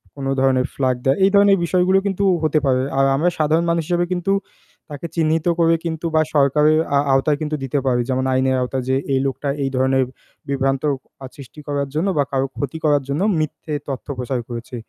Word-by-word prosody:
কোনো 135 -1 -4
ধরনের 130 -1 +2
flag 130 -2 +1
দেওয়া। 135 +1 +2
এই 195 - +6
ধরনের 200 -1 +5
বিষয়গুলো 185 +2 +2
কিন্তু 200 0 -1 0.2
হতে 155 0 +2
পারে। 130 -1 +2 0.2
আর 135 - +4
আমরা 170 +5 +2
সাধারণ 160 +3 +2
মানুষ 170 -1 +1
হিসেবে 175 0 +1
কিন্তু 180 +2 0 0.6
তাকে 145 +4 -6
চিহ্নিত 160 0 +1
করে 165 0 +4
কিন্তু 160 0 -4
বা 155 - +5
সরকারের 150 +2 +4 0.2
আ - - +4
আওতায় 145 +2 +2
কিন্তু 155 0 -2
দিতে 135 +2 -1
পারি। 125 -2 +2
যেমন 130 0 0
আইনের 130 0 +2
আওতায়, 125 0 -2
যে 130 - +2 0.2
এই 130 - +2
লোকটা 140 +1 -2
এই 135 - 0
ধরনের 130 0 +2 0.5
বিভ্রান্তি 135 +1 0 0.4
আ - - -5
সৃষ্টি 140 +1 -12
করার 140 -1 -1
জন্য 170 +6 0
বা 145 - +4
কারো 135 0 0
ক্ষতি 145 +3 -3
করার 145 -2 +3
জন্য 145 +6 -1 0.2
মিথ্যে 155 0 -4
তথ্য 135 0 -5
প্রচার 125 0 -2
করেছে। 120 +1 -7
145 Hz, 200 wpm, -20 LUFS, 130-160 Hz, 0.6 s, এই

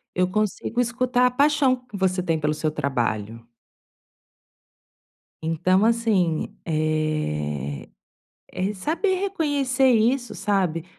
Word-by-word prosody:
eu 180 0 +2
consigo 215 +4 -1
escutar 250 +1 +2
a - - 0
paixão 280 0 +3
que 250 -4 -14
você 185 -1 0
tem 165 -3 0
pelo 150 0 0
seu 155 0 -1
trabalho. 115 -5 -2 2.0
Então, 185 +5 +2
assim, 215 -8 +1
eh, 155 - -2 0.7
é - - -6
re 205 +2 -1
saber 335 - 0
reconhecer 285 -9 +1
isso, 240 +2 +2
sabe. 185 -5 0
190 Hz, 110 wpm, -24 LUFS, 155-250 Hz, 2.0 s, paixão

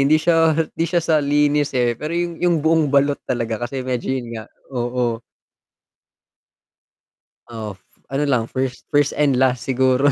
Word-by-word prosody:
hindi 155 - +6
siya 165 +2 +2 0.2
hindi 165 0 -1
siya 175 -2 +1
sa 155 -2 +3
linis, 145 0 +2
eh, 120 -1 +2
pero 155 +3 -3
'yong 175 -1 -2
'yong 175 -1 +3
buong 160 0 +4
balot 140 +1 +2
talaga 115 -2 -2
kasi 130 -2 -5
medyo 125 -2 -3
'yon 120 -2 -6
nga, 110 -1 -6 0.3
oo. 120 -2 -1 2.3
Oh, 110 -4 -6 0.3
ano 135 +2 0
lang 125 -5 +2
1st, 130 -1 -3
1st 145 -1 +2
and 140 -4 +2
last 130 -2 +2
siguro. 130 +2 +3
135 Hz, 155 wpm, -20 LUFS, 125-150 Hz, 2.3 s, hindi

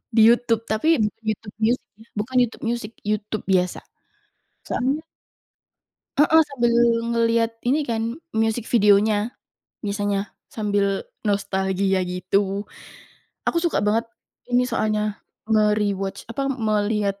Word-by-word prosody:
Di 225 - +6
YouTube 230 -1 +3
tapi 310 +11 +2 1.2
bukan 240 +5 -3
YouTube 230 - -3
Music, 230 -1 -2
YouTube 210 0 -2
biasa. 180 -2 +1 0.9
Soalnya 275 +6 -1 1.2
Mhm, 320 +2 +6
sambil 240 -4 +1 0.4
ngelihat 230 0 +2
ini 280 +4 +1
kan, 230 +2 -2 0.2
music 225 +1 0
videonya 210 0 +3 0.5
misalnya, 205 0 -1 0.2
sambil 205 -2 0 0.2
nostalgia 190 -1 +1
gitu. 195 +2 0 0.8
Aku 340 - +1
suka 335 -10 0
banget 225 +2 +1 0.4
ini 245 0 +3
soalnya, 215 -3 -1 0.3
me-rewatch, 210 -2 +1
apa, 275 +4 -2
melihat 210 -5 0
215 Hz, 100 wpm, -23 LUFS, 200-235 Hz, 1.2 s, Di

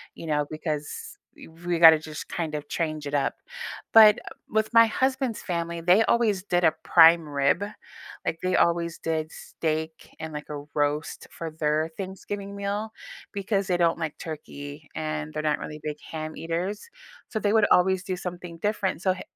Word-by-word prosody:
you - - -9
know, 150 -1 +1
because, 155 -1 -5 0.2
e - - -12
we 170 +1 -3
gotta 160 -2 +10
just 155 -1 -8
kind 165 -3 -3
of 150 0 -6
change 155 -3 -2
it 145 - -6
up, 145 -1 +1 0.6
but 215 -2 +9 0.3
with 220 0 +1
my 230 0 +8
husband's 260 0 0
family, 170 -1 -3
they 180 +6 +5
always 215 -5 +2
did 175 -3 +1
a 160 - +5
prime 165 -1 +6
rib. 140 +5 +1 0.6
Like, 165 - -2
they 185 0 +1
always 170 0 +2
did 160 -1 -2
steak 160 0 -4
and, 160 0 -5
like, 150 0 -6
a 145 -1 -5
roast 150 +1 -1
for 165 -1 -6
their 155 0 0
Thanksgiving 200 +1 -6
meal 205 +2 -3 0.4
because 200 0 -1
they 180 - +1
don't 170 -1 +2
like 155 -2 -3
turkey, 145 -2 -8
and 75 -1 -3
they're 155 - -3
not 150 -1 +1
really 150 0 -7
big 150 -1 -4
ham 155 0 -5
eaters, 180 - -3 0.4
so 220 - -2
they 205 -1 +1
would 220 -2 +5
always 190 +1 +4
do 185 -1 -3
something 175 -2 -7
different, 205 -3 -1
so 190 -1 +2
h 185 - -9
165 Hz, 175 wpm, -26 LUFS, 155-190 Hz, 0.6 s, gotta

